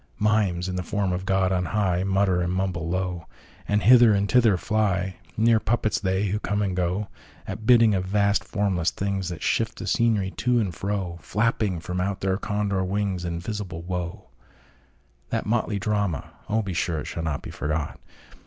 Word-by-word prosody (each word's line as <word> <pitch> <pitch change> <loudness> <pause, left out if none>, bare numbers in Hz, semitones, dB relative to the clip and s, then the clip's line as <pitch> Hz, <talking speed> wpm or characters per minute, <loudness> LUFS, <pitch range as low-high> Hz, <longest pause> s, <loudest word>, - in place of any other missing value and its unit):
Mimes, 100 -5 +1
in 90 0 -3
the - - -1
form 95 +1 -1
of 95 +1 -4
God 95 -1 +2
on 90 -1 +1
high, 95 -2 +1
Mutter 95 -2 +2
and 90 0 -1
mumble 90 -3 -1
low, 90 -1 -2 0.4
And 105 0 +1
hither 120 -2 +7
and 100 0 +1
thither 115 -4 +4
fly—Mere 105 +3 +1
puppets 110 +1 0
they, 95 -1 0
who 105 +2 -1
come 105 -1 -1
and 95 -2 -1
goAt 90 +3 -1 0.6
bidding 115 -3 +6
of 95 -2 0
vast 100 +1 +2
formless 95 -5 0
thingsThat 95 -4 -3
shift - - 0
the - - -6
scenery 110 -5 +1
to 125 -1 +2
and 100 -6 -1
fro, 95 -2 -3
Flapping 105 -4 0
from 90 +2 -3
out 95 +1 -2
their 95 -1 +1
Condor 105 -3 -1
wingsInvisible 95 -1 -3
Woe! 90 +2 -4 1.1
That - - -1
motley 110 -2 0
drama—oh, 105 +1 -2
be 95 -2 -4
sureIt 80 -2 -1
shall 85 - -4
not 80 -3 -3
be - - -7
forgot! 75 0 -3
95 Hz, 160 wpm, -25 LUFS, 90-105 Hz, 1.1 s, hither